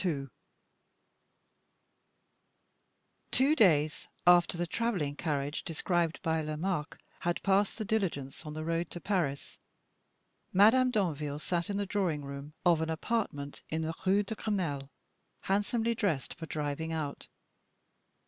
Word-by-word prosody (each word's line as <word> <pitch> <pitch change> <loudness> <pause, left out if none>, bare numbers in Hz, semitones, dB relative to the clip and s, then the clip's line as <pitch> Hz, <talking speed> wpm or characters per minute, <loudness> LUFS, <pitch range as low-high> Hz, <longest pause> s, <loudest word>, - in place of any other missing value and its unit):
Two 275 +4 +4
days 155 - +3 0.2
after 175 -1 +6
the 175 - 0
traveling 175 -7 -1
carriage 145 0 -2
described 170 0 0
by 160 -2 +1
Lomaque 155 +1 -2 0.2
had 175 0 -1
passed 195 +1 +2
the 215 - -3
diligence 185 - -1
on 150 -2 -6
the 155 - -3
road 165 +1 -1
to 175 - -6
Paris, 170 -9 -2 0.9
Madame 225 +7 +6
Danville 155 - -1
sat 170 +4 -2
in 200 - -1
the 205 - 0
drawing 180 -8 -1
room 140 +2 -7
of 170 -2 +5
an 160 - -1
apartment 160 -5 -2
in 160 +1 -1
the 160 +1 -2
Rue 200 +2 +4
de 205 - -5
Grenelle, 170 -11 -2 0.5
handsomely 225 +4 +1
dressed 185 - -1
for 160 -1 -8
driving 150 +1 -3
out. 155 -3 -4
170 Hz, 125 wpm, -31 LUFS, 150-200 Hz, 0.9 s, after